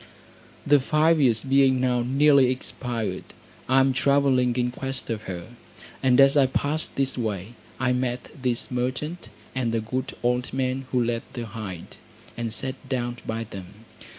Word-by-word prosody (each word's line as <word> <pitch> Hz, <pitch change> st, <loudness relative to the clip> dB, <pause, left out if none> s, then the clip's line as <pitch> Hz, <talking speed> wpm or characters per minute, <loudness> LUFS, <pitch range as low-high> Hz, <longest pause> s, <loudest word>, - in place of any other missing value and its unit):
The 145 Hz, 0 st, +5 dB
five 155 Hz, +3 st, +3 dB
years 115 Hz, -5 st, +3 dB
being 135 Hz, -1 st, +4 dB
now 125 Hz, -1 st, +1 dB
nearly 135 Hz, +1 st, +4 dB
expired, 120 Hz, -6 st, -3 dB, 0.5 s
I 135 Hz, +1 st, +5 dB
am 135 Hz, 0 st, +3 dB
travelling 130 Hz, -2 st, +3 dB
in 125 Hz, -1 st, 0 dB
quest 135 Hz, -1 st, -5 dB
of 110 Hz, -1 st, -4 dB
her; 90 Hz, +1 st, -6 dB, 0.5 s
and 130 Hz, -1 st, +4 dB
as 135 Hz, +1 st, +7 dB
I 140 Hz, -2 st, +5 dB
passed 145 Hz, +4 st, -2 dB
this 135 Hz, -1 st, 0 dB
way, 105 Hz, -1 st, -3 dB, 0.3 s
I 125 Hz, 0 st, +2 dB
met 125 Hz, 0 st, -2 dB
this 125 Hz, -1 st, -1 dB
merchant, 130 Hz, +4 st, -3 dB, 0.2 s
and 125 Hz, -3 st, -1 dB
the 115 Hz, -, +1 dB
good 125 Hz, +4 st, -4 dB
old 125 Hz, +1 st, 0 dB
man 130 Hz, 0 st, -1 dB
who 125 Hz, -2 st, +2 dB
led 115 Hz, 0 st, -1 dB
the 120 Hz, -3 st, -4 dB
hind, 105 Hz, -6 st, -8 dB, 0.4 s
and 115 Hz, -1 st, -3 dB
sat 130 Hz, +3 st, -5 dB
down 120 Hz, -2 st, -2 dB
by 115 Hz, +1 st, -2 dB
them. 105 Hz, +1 st, -11 dB
125 Hz, 160 wpm, -25 LUFS, 115-135 Hz, 0.5 s, as